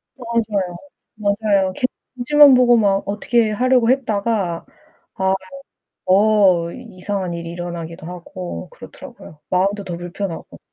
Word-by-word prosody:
맞아요. 220 -7 -2 0.4
맞아요. 200 -2 +1
괜히 255 - -1 0.3
눈치만 285 +3 +6
보고 245 -1 +5
막 200 -3 +2
어떻게 220 +3 +1
하려고 250 +1 +2
했다가 215 -8 0 0.5
아유 190 0 +1 0.7
어 190 -3 +4
이상한 195 -6 -5
일이 170 0 -6
일어나기도 170 -2 -7
하고 180 - -7
그렇더라고요. 150 - -13
마음도 195 +2 +1
더 175 - -5
불편하고. 175 0 -6
200 Hz, 290 characters per minute, -20 LUFS, 180-230 Hz, 0.7 s, 눈치만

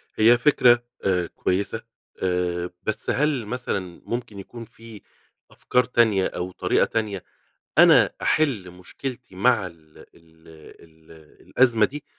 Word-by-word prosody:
هي 115 +3 +5
فكرة 120 -3 +4 0.2
آآ، 90 -3 +1
كويسة 100 +7 -2 0.4
آآ، 90 -1 -1
بس 110 - -4
هل 145 -5 0
مثلًا 105 -7 -5
ممكن 120 -4 -5
يكون 115 +4 -10
في 115 -1 -14 0.5
أفكار 125 - +1
تانية، 110 -6 +2
أو 90 +1 -5
طريقة - - +1
تانية 105 -4 -3 0.6
أنا - - +6
أحل 125 -13 0
مشكلتي 120 +6 -8
مع 110 0 +2
ال 80 -3 -16
ال - - -13 0.8
ال 80 0 -20 0.4
الأزمة 120 -4 +3
دي؟ 150 +1 -9
110 Hz, 125 wpm, -23 LUFS, 90-120 Hz, 0.8 s, أنا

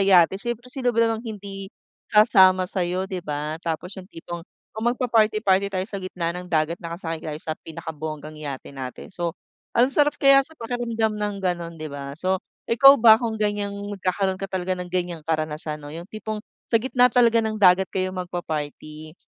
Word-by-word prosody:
yate. 190 -1 +5
Si 240 0 -2 0.2
sino 255 -2 -1
ba - - +1
namang 225 -1 0
hindi 200 -4 -7 0.4
sasama 190 -3 +6
sa 185 +1 -3
'yo, 180 +1 -1
'di 190 -1 -5
ba 150 +1 -4
tapos 175 +4 -4
yung 185 - -15
tipong, 170 0 -7 0.3
kung 220 +2 -5
magpaparty-party 215 -5 +2
tayo 190 -1 -2
sa 200 -1 -6
gitna 180 -2 -3
ng 180 +1 -7
dagat 165 +1 0
nakasakay 165 -1 -5
tayo 150 -1 -5
sa 155 +1 -4
pinakabonggang 155 -1 -7
yate 145 -3 -7
natin. 135 +8 -8
So, 175 -1 -3 0.4
ang 250 +3 +4
sarap 295 +1 +3
kaya 275 0 +7
sa 315 +4 -8
pakiramdam 230 -2 -1
ng 205 -1 -1
gano'n, 170 -2 -2
'di 155 -2 -7
ba? 140 0 -7
So, 185 +2 0 0.2
ikaw 275 +4 +7
ba 225 -2 +7
kung 225 -2 -2
gan'yang 205 -1 -1 0.2
magkakaroon 190 0 -1
ka 195 - -4
talaga 185 0 -2
ng 180 -1 -4
gan'yang 175 -2 -2
karanasan 155 -1 -3
'no, 145 - -8
yung 170 +4 -8
tipong 215 0 -5 0.3
sa 230 - +4
gitna 250 +1 +4
talaga 235 -1 +4
ng 220 -1 -2
dagat 190 -2 +5
kayo 185 0 -2
magpa-party. 155 -3 -5
185 Hz, 180 wpm, -24 LUFS, 165-215 Hz, 0.4 s, kaya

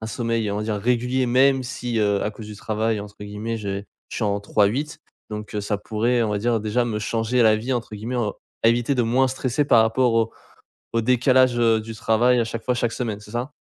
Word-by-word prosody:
un 110 - -5
sommeil, 115 -1 -1
on 100 - -2
va 105 - -2
dire, 110 -1 -2
régulier 125 +4 0
même 130 +2 +4
si, 120 -2 -3
heu, 100 -1 +2
à - - -1
cause 105 0 -10
du 105 -1 -9
travail 110 +1 -1
entre 105 0 -10
guillemets, 105 +3 -4
j'ai 100 -2 -4 0.3
je - - -6
suis 115 - -1
en 100 0 0
3x8 105 +9 0 0.3
donc, 105 0 -6
heu, 105 - -1
ça 105 +1 -1
pourrait 115 +4 0
on 110 - 0
va 105 - 0
dire 115 +2 +1
déjà 110 +3 0
me 105 -2 -2
changer 115 +3 0
la 110 -1 +6
vie 125 +4 -2
entre 115 -3 -4
guillemets 115 +5 -4
en 110 -4 0 0.3
à 115 - +6
éviter 120 +4 +2
de 125 - +2
moins 125 +3 +2
stresser 130 +2 -1
par 115 -5 +6
rapport 115 +2 +2
au 115 -1 +1 0.6
au 115 - +2
décalage, 125 +1 +3
heu, 115 -2 +3
du 110 +1 -8
travail 120 +3 +3
à - - +2
chaque 115 0 -5
fois, 125 - +1
chaque 120 -1 0
semaine, 115 -4 -3
c'est 105 0 -14
ça? 120 +5 -3
115 Hz, 240 wpm, -23 LUFS, 105-125 Hz, 0.6 s, la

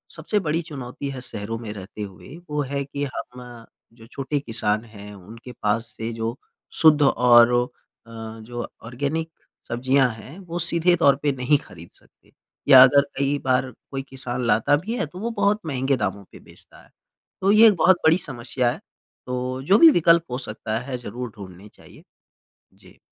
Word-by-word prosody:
सबसे 210 - -1
बड़ी 165 -2 -1
चुनौती 140 -4 -7
है 135 -2 -7
शहरों 115 -2 -5
में 115 -3 -7
रहते 100 +1 -10
हुए 100 +8 -9
वो 150 0 -1
है 140 0 -1
कि 140 +1 -5
हम 125 -2 -9 0.3
जो 115 -1 -16
छोटे 135 +3 -3
किसान 110 -4 -1
हैं 105 -2 -12
उनके 110 +6 -12
पास 105 +2 0
से 115 +1 -4
जो 115 +1 -3 0.5
शुद्ध 155 -2 +6
और 120 -3 +5
ओ 120 0 +2
अ, - - -28 0.7
जो 120 +2 -6 0.2
ऑर्गेनिक 140 +7 -3 0.4
सब्जियाँ 130 +2 +2
हैं 110 - -12
वो 175 -2 -6
सीधे 170 +1 +2
तौर 140 -5 +4
पे 145 - +2
नहीं 135 +2 +1
ख़रीद 85 -1 -14
सकते - - -28 0.4
या 130 - +10
अगर 140 +2 +6 0.2
कई 140 +1 0
बार 130 0 +1 0.2
कोई 135 -1 -3
किसान 130 -1 -4
लाता 110 +6 +3
भी 210 +10 -5
है - - -1
तो 175 +5 -11
वो 230 +4 -3
बहुत 205 +1 +2
महँगे 135 -2 0
दामों 100 -2 -3
पे - - -13
बेचता - - -16
है। - - -23 0.5
तो 195 +1 +3
ये 220 +2 +8
एक 210 - +4
बहुत 185 +2 +4
बड़ी 160 +2 +5
समस्या 125 -5 -2
है - - -8 0.5
तो 125 +1 -4
जो 190 +8 +4
भी 330 - +9
विकल्प 170 - +4
हो 125 - -2
सकता 110 -3 -5
है 125 +1 -5
ज़रूर 120 +1 -7
ढूँढने 95 0 -11
चाहिए। - - -18 0.7
जी। - - -20
130 Hz, 180 wpm, -23 LUFS, 115-150 Hz, 0.7 s, या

